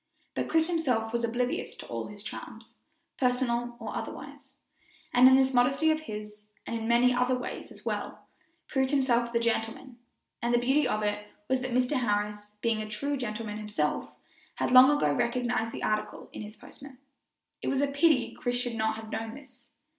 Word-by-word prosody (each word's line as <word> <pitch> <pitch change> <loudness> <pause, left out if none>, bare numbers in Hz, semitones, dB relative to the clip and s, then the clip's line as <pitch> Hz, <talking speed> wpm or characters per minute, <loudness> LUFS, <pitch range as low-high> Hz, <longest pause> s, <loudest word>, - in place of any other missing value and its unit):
But - - -2
Chris 320 0 +3
himself 250 -10 0
was 235 0 0
oblivious 245 +2 -1
to - - -10
all - - -4
his - - -8
charms, - - -8 0.5
personal 245 -2 +1
or 225 - -5
otherwise, - - -7 0.6
and 250 +1 +8
in 260 - +8
this 265 0 +3
modesty 270 +6 +4
of 310 - +1
his, 210 -6 -8 0.2
and 230 - -3
in 225 -1 -3
many 240 +2 +4
other 250 +1 +2
ways 250 - -6
as - - -14
well, - - -4 0.4
proved 265 -1 +1
himself 245 -4 +2
the 235 - +2
gentleman; 235 +2 -2 0.4
and 240 0 +2
the - - +5
beauty 265 +4 +3
of 215 -3 -1
it 210 0 -2 0.2
was 260 0 +1
that 255 - -3
Mr. 255 +3 +1
Harris, 210 -2 -1
being 230 -2 +1
a 215 - -6
true 280 +7 -2
gentleman 215 -4 -4
himself, 210 -8 -1 0.5
had - - -1
long 255 +1 +9
ago 295 0 +3
recognized 240 -1 0
the - - -6
article 215 0 -2
in - - -6
his 210 0 -8
postman. 270 +4 -13 0.6
It - - -4
was 270 - +1
a - - +4
pity 280 -1 +3
Chris 245 0 -2
should 245 -1 -2
not 220 0 0
have 220 0 -9
known 225 0 -4
this. 255 -4 -15
245 Hz, 185 wpm, -29 LUFS, 220-260 Hz, 0.6 s, long